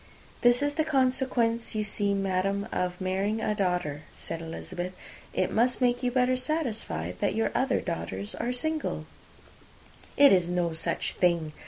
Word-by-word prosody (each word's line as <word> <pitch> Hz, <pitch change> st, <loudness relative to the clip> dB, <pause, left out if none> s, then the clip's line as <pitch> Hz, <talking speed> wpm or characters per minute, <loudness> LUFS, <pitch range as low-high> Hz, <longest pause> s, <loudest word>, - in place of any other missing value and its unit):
"This 240 Hz, +3 st, +5 dB
is 290 Hz, 0 st, +1 dB
the 315 Hz, +1 st, +1 dB
consequence, 255 Hz, -5 st, +1 dB
you 215 Hz, -, +1 dB
see, 205 Hz, -1 st, +1 dB
madam, 195 Hz, +1 st, 0 dB
of 180 Hz, 0 st, -1 dB
marrying 195 Hz, +3 st, 0 dB
a 215 Hz, -, 0 dB
daughter," 180 Hz, -7 st, -1 dB
said 165 Hz, -, -5 dB
Elizabeth. 175 Hz, +2 st, -5 dB, 0.4 s
"It -, -, 0 dB
must 245 Hz, +3 st, +3 dB
make 245 Hz, -1 st, +2 dB
you 250 Hz, -, +1 dB
better 250 Hz, 0 st, +2 dB
satisfied 225 Hz, -, -2 dB
that -, -, 0 dB
your 225 Hz, -, +1 dB
other 260 Hz, 0 st, +2 dB
four 100 Hz, -, -4 dB
are 245 Hz, -, -1 dB
single." 310 Hz, +5 st, -2 dB, 1.1 s
"It 280 Hz, -4 st, +8 dB
is 180 Hz, -2 st, +3 dB
no 175 Hz, -2 st, 0 dB
such 165 Hz, +1 st, -1 dB
thing. 170 Hz, -4 st, +1 dB
210 Hz, 155 wpm, -28 LUFS, 180-250 Hz, 1.1 s, It